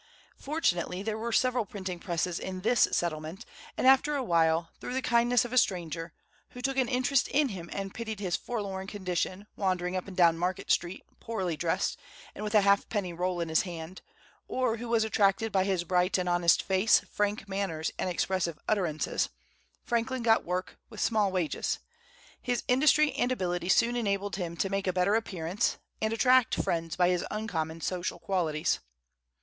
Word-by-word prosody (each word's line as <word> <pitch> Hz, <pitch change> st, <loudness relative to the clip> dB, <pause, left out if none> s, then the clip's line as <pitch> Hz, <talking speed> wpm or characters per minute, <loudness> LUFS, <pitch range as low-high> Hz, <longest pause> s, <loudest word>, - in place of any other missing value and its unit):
Fortunately, 195 Hz, -, -1 dB
there 215 Hz, 0 st, -2 dB
were 235 Hz, +1 st, -3 dB
several 255 Hz, +1 st, +2 dB
printing 190 Hz, -5 st, -6 dB
presses 170 Hz, -1 st, -2 dB
in 185 Hz, -1 st, -5 dB
this 230 Hz, +3 st, +4 dB
settlement; 160 Hz, +1 st, -2 dB, 0.3 s
and -, -, 0 dB
after 270 Hz, +3 st, +5 dB
a 275 Hz, -, -1 dB
while, 165 Hz, -4 st, +2 dB
through 250 Hz, -, -5 dB
the 260 Hz, -, 0 dB
kindness 240 Hz, 0 st, +3 dB
of 240 Hz, -, -7 dB
a 255 Hz, -, +6 dB
stranger, 170 Hz, -4 st, -2 dB, 0.4 s
who 250 Hz, -, -8 dB
took 270 Hz, 0 st, 0 dB
an 260 Hz, -2 st, +3 dB
interest 255 Hz, +1 st, +2 dB
in 285 Hz, 0 st, +2 dB
him 175 Hz, -5 st, -7 dB
and 195 Hz, -1 st, -4 dB
pitied 220 Hz, -3 st, -5 dB
his 185 Hz, -3 st, -1 dB
forlorn 195 Hz, -5 st, -4 dB
condition, 185 Hz, 0 st, -3 dB
wandering 185 Hz, -2 st, -1 dB
up 185 Hz, -, -3 dB
and 195 Hz, -, -9 dB
down 170 Hz, -2 st, +5 dB
Market 185 Hz, +2 st, -1 dB
Street, 175 Hz, +2 st, 0 dB, 0.2 s
poorly 190 Hz, -7 st, -2 dB
dressed, 165 Hz, +2 st, -1 dB, 0.3 s
and -, -, -7 dB
with 210 Hz, +1 st, -2 dB
a 210 Hz, -, +7 dB
halfpenny 200 Hz, -1 st, +1 dB
roll 180 Hz, +1 st, -1 dB
in 165 Hz, -, -3 dB
his 160 Hz, -, +3 dB
hand, 175 Hz, 0 st, -7 dB, 0.5 s
or 255 Hz, -3 st, 0 dB
who 235 Hz, +1 st, -6 dB
was 230 Hz, -1 st, +3 dB
attracted 215 Hz, 0 st, +2 dB
by 190 Hz, -1 st, +3 dB
his 190 Hz, -3 st, 0 dB
bright 180 Hz, +2 st, +2 dB
and 180 Hz, -1 st, -1 dB
honest 175 Hz, -1 st, +3 dB
face, 190 Hz, +3 st, +4 dB
frank 205 Hz, 0 st, -1 dB
manners, 190 Hz, -5 st, -2 dB
and -, -, 0 dB
expressive 175 Hz, -2 st, -1 dB
utterances, 175 Hz, -8 st, 0 dB, 0.5 s
Franklin 240 Hz, +2 st, -1 dB
got 225 Hz, -1 st, +4 dB
work, 180 Hz, +1 st, -4 dB
with 215 Hz, -, -10 dB
small 210 Hz, -4 st, +2 dB
wages. 180 Hz, -5 st, -1 dB, 0.6 s
His 245 Hz, -1 st, -1 dB
industry 295 Hz, +3 st, +4 dB
and 255 Hz, -2 st, 0 dB
ability 180 Hz, -6 st, -2 dB
soon 235 Hz, +5 st, +4 dB
enabled 200 Hz, -4 st, -1 dB
him 170 Hz, -3 st, -4 dB
to 195 Hz, -, 0 dB
make 195 Hz, 0 st, -1 dB
a 185 Hz, -, +1 dB
better 185 Hz, +3 st, +2 dB
appearance, 190 Hz, -4 st, -1 dB, 0.2 s
and 220 Hz, 0 st, +1 dB
attract 250 Hz, +1 st, +4 dB
friends 165 Hz, -1 st, -1 dB
by 180 Hz, -1 st, +3 dB
his 180 Hz, -1 st, +1 dB
uncommon 165 Hz, -7 st, -3 dB
social 180 Hz, 0 st, -2 dB
qualities. 165 Hz, -4 st, 0 dB
195 Hz, 175 wpm, -29 LUFS, 175-225 Hz, 0.6 s, a